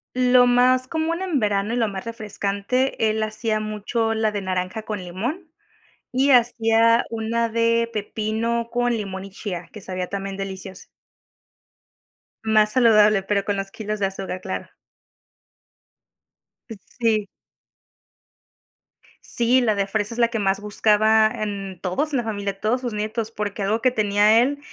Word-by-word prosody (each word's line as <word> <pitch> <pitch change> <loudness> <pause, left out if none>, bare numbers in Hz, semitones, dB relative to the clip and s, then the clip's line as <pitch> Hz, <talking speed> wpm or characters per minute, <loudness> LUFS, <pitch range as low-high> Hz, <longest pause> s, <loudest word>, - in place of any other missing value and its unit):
Lo 250 0 +5
más 255 +1 +4
común 330 +3 -2
en 345 -8 0
verano 205 0 0
y - - 0
lo 230 -3 +1
más 195 +2 -6
refrescante, 215 +2 -1
él 220 0 -1
hacía 215 0 -2
mucho 215 +2 -2
la 220 -1 0
de 205 - -3
naranja 185 +3 -3
con 210 -3 -4
limón, 250 - -5 0.6
y 270 +2 +2
hacía 230 -1 +4
una 230 +1 -1
de 230 0 +1
pepino 220 +2 -2
con 245 0 +1
limón 195 -2 -5
y 195 - -10
chía, 185 -3 -6
que 215 - -9
sabía 185 -1 -4
también 195 -1 -4
deliciosa. 190 -1 -7 1.6
Más 215 -1 +3
saludable, 215 -5 +5
pero 200 0 0
con 205 - 0
los 195 0 -4
kilos 215 -1 -5
de 195 - +1
azúcar, 190 -1 -6
claro. - - -5 2.0
Sí. 220 0 -2 2.0
Sí, 245 +2 +2
la 220 -3 +2
de 200 0 0
fresa 210 +2 -2
es - - -6
la 235 - +5
que 230 -2 -2
más 195 0 +1
buscaba, 215 +1 +3
em, 200 -3 -5
todos 240 - -2
en 270 - +2
la 240 - 0
familia, 200 -3 -4
todos 245 +4 0
sus 240 -3 -4
nietos, 215 +1 -3
porque 205 -2 -4
algo 215 +4 0
que 255 - +3
tenía 215 0 +4
él, 285 +3 0
215 Hz, 150 wpm, -22 LUFS, 200-235 Hz, 2.0 s, Lo